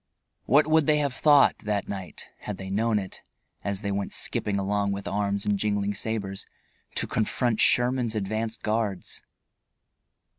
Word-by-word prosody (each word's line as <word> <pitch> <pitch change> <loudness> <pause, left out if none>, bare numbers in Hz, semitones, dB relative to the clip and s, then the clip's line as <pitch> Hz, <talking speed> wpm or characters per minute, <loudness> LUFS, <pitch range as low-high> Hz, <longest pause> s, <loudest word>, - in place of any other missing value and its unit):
What 145 +6 +5
would 155 -1 +3
they 150 -1 +4
have 140 -3 0
thought, 145 +1 +5
that 105 -2 -2
night, 95 -3 -7
had 105 -2 -6
they 95 0 -7
known 110 +2 +1
it 95 -2 -5 0.4
as 100 -1 -2
they 100 -2 -2
went 100 0 -2
skipping 100 -1 0
along 100 +1 0
with 100 0 -4
arms 100 0 -1
and 100 -1 +1
jingling 105 -1 0
sabers, 100 -2 -3 0.5
to - - +1
confront 115 +1 0
Sherman's 120 -2 +3
advance 110 +2 -2
guards? 110 -4 -2
105 Hz, 150 wpm, -26 LUFS, 100-115 Hz, 0.5 s, What